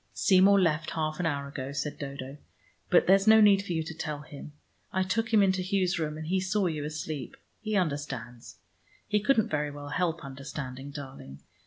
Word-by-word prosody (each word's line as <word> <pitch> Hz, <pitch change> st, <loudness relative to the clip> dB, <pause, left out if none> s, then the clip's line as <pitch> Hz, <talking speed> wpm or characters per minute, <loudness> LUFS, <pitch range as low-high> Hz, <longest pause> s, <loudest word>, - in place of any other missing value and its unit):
"Seymour 195 Hz, +1 st, +5 dB
left 160 Hz, -3 st, +1 dB
half 155 Hz, 0 st, -2 dB
an 175 Hz, -, +1 dB
hour 140 Hz, -2 st, -2 dB
ago," 140 Hz, -1 st, -6 dB
said 145 Hz, +1 st, -4 dB
Dodo. 140 Hz, -1 st, -6 dB, 0.5 s
"But -, -, +5 dB
there's 195 Hz, +2 st, +4 dB
no 220 Hz, 0 st, +8 dB
need 205 Hz, -2 st, +6 dB
for 180 Hz, -, -4 dB
you 160 Hz, -1 st, -1 dB
to 160 Hz, -, -7 dB
tell 150 Hz, -2 st, -5 dB
him. 150 Hz, -1 st, -10 dB, 0.4 s
I 190 Hz, -, +1 dB
took 220 Hz, +4 st, -1 dB
him 215 Hz, -3 st, +5 dB
into 190 Hz, -1 st, +2 dB
Hugh's 185 Hz, -1 st, 0 dB
room 155 Hz, -1 st, -2 dB
and 155 Hz, -, -6 dB
he 185 Hz, +4 st, +1 dB
saw 190 Hz, +2 st, 0 dB
you 155 Hz, -4 st, -2 dB
asleep. 155 Hz, -1 st, -5 dB, 0.2 s
He 215 Hz, -1 st, -3 dB
understands. 140 Hz, -, -3 dB, 0.5 s
He 210 Hz, 0 st, +2 dB
couldn't 220 Hz, 0 st, +2 dB
very 150 Hz, -1 st, -1 dB
well 145 Hz, 0 st, -8 dB
help 165 Hz, -1 st, -1 dB
understanding, 135 Hz, 0 st, -7 dB
darling. 135 Hz, -, -9 dB
155 Hz, 190 wpm, -28 LUFS, 145-190 Hz, 0.5 s, no